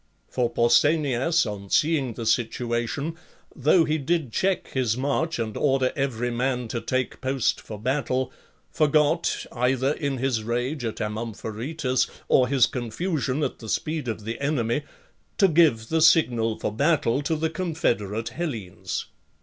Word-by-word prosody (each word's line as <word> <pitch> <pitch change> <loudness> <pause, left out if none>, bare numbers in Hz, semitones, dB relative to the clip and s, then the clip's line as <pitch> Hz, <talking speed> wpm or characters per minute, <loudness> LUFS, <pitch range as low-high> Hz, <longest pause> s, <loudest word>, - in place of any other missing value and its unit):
For 125 -2 0
Pausanias, 145 +5 +3
on 100 -2 -6
seeing 145 - +2
the 115 - -5
situation, 120 +6 -1 0.4
though 155 +5 +4
he 155 0 0
did 145 -4 -1
check 190 -1 0
his 125 -4 0
march 145 +5 0
and 110 -2 -3
order 135 -3 +1
every 125 -3 -1
man 125 0 -1
to 115 -1 -3
take 130 -1 -2
post 130 -1 0
for 110 - -8
battle, 130 +1 -1 0.4
forgot, 155 +2 +2
either 130 +2 +1
in 140 -3 -2
his 125 -3 0
rage 120 +5 -2
at 115 -2 -4
Amom 110 +1 -3
pharetus 125 +4 -1 0.2
or 125 - +4
his 130 -2 +4
confusion 135 - -2
at - - -3
the 110 - -8
speed 150 +6 -2
of 110 -2 -4
the 115 +1 -4
enemy, 140 -3 0 0.6
to 195 - +6
give 150 -10 +3
the 160 0 +1
signal 120 -9 +4
for - - -2
battle 140 0 +2
to 155 +3 0
the 160 +1 -1
confederate 120 - -1
Hellenes. 115 - -4
130 Hz, 150 wpm, -25 LUFS, 115-155 Hz, 0.6 s, to